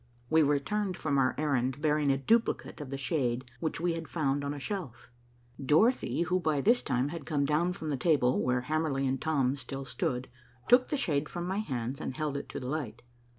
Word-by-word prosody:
We 160 Hz, 0 st, +6 dB
returned 175 Hz, +7 st, 0 dB
from 145 Hz, -3 st, 0 dB
our 130 Hz, -1 st, +2 dB
errand, 135 Hz, -3 st, 0 dB
bearing 150 Hz, -1 st, +2 dB
a 135 Hz, -, +2 dB
duplicate 220 Hz, -, +1 dB
of 145 Hz, -, -7 dB
the 135 Hz, -, -4 dB
shade 130 Hz, -4 st, -1 dB
which 160 Hz, 0 st, -2 dB
we 170 Hz, 0 st, +1 dB
had 165 Hz, -1 st, -5 dB
found 140 Hz, -3 st, 0 dB
on 140 Hz, -, -2 dB
a 145 Hz, -, -5 dB
shelf. 135 Hz, -, -6 dB, 0.5 s
Dorothy, 170 Hz, -, +3 dB
who 180 Hz, +2 st, +1 dB
by 155 Hz, -4 st, +1 dB
this 235 Hz, -, +4 dB
time 130 Hz, 0 st, 0 dB
had 165 Hz, -1 st, -6 dB
come 145 Hz, -3 st, +1 dB
down 160 Hz, +5 st, +1 dB
from 160 Hz, -3 st, -4 dB
the 140 Hz, -, 0 dB
table 130 Hz, -4 st, +2 dB
where 125 Hz, 0 st, +1 dB
Hamerly 150 Hz, -1 st, 0 dB
and 130 Hz, 0 st, -1 dB
Tom 140 Hz, -4 st, +1 dB
still 135 Hz, +1 st, -6 dB
stood, 125 Hz, -1 st, -2 dB, 0.4 s
took 245 Hz, +1 st, +5 dB
the 295 Hz, -, 0 dB
shade 155 Hz, -, 0 dB
from 175 Hz, 0 st, -4 dB
my 190 Hz, +3 st, -1 dB
hands 130 Hz, -, -3 dB
and 130 Hz, -, -4 dB
held 150 Hz, -2 st, -2 dB
it 140 Hz, -, -5 dB
to -, -, -5 dB
the 125 Hz, -, -6 dB
light. 125 Hz, -5 st, -4 dB
145 Hz, 210 wpm, -30 LUFS, 135-165 Hz, 0.5 s, We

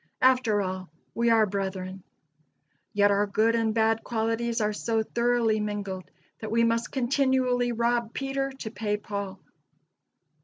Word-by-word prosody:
After 250 Hz, -5 st, +4 dB
all, 185 Hz, -2 st, -5 dB, 0.2 s
we 235 Hz, 0 st, +1 dB
are 225 Hz, -1 st, +5 dB
brethren. 190 Hz, -1 st, -4 dB, 0.9 s
Yet, 205 Hz, 0 st, +4 dB
our 205 Hz, +1 st, +2 dB
good 220 Hz, +3 st, +2 dB
and 225 Hz, -1 st, +1 dB
bad 225 Hz, 0 st, +2 dB
qualities 230 Hz, +1 st, -1 dB
are 210 Hz, -1 st, +1 dB
so 225 Hz, +1 st, 0 dB
thoroughly 235 Hz, -1 st, +1 dB
mingled 205 Hz, -3 st, -4 dB, 0.3 s
that 220 Hz, -, -5 dB
we 230 Hz, +2 st, +3 dB
must 230 Hz, +1 st, +1 dB
continually 255 Hz, -2 st, +1 dB
rob 235 Hz, 0 st, 0 dB
Peter 270 Hz, +1 st, -2 dB
to 220 Hz, -, -5 dB
pay 210 Hz, -3 st, -1 dB
Paul. 200 Hz, -2 st, -5 dB
225 Hz, 140 wpm, -27 LUFS, 205-235 Hz, 0.9 s, are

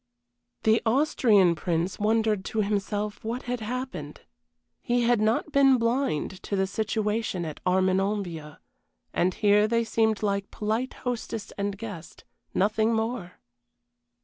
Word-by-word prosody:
The 220 Hz, +1 st, +4 dB
Austrian 225 Hz, -, +4 dB
Prince 170 Hz, +2 st, -2 dB
wondered 215 Hz, -1 st, +1 dB
to 220 Hz, -, -1 dB
himself 205 Hz, +1 st, -2 dB
what 235 Hz, +3 st, -3 dB
had 245 Hz, 0 st, -3 dB
happened. 225 Hz, -, -5 dB, 0.6 s
He 240 Hz, 0 st, +1 dB
had 235 Hz, -2 st, +3 dB
not 220 Hz, +7 st, +1 dB
been 275 Hz, -2 st, +5 dB
blind 230 Hz, -, -1 dB
to 200 Hz, -, -3 dB
the 190 Hz, 0 st, +2 dB
situation 210 Hz, -2 st, -1 dB
at 155 Hz, -, -6 dB
Armenonville, 185 Hz, -4 st, 0 dB, 0.6 s
and 180 Hz, +1 st, +1 dB
here 210 Hz, 0 st, +4 dB
they 230 Hz, +1 st, +1 dB
seemed 220 Hz, -1 st, +1 dB
like 200 Hz, -1 st, -1 dB
polite 220 Hz, +4 st, -2 dB
hostess 230 Hz, -3 st, -4 dB
and 200 Hz, 0 st, -2 dB
guest, 205 Hz, -6 st, -9 dB, 0.3 s
nothing 215 Hz, +3 st, +2 dB
more. 220 Hz, -5 st, -2 dB
215 Hz, 125 wpm, -27 LUFS, 195-230 Hz, 0.6 s, been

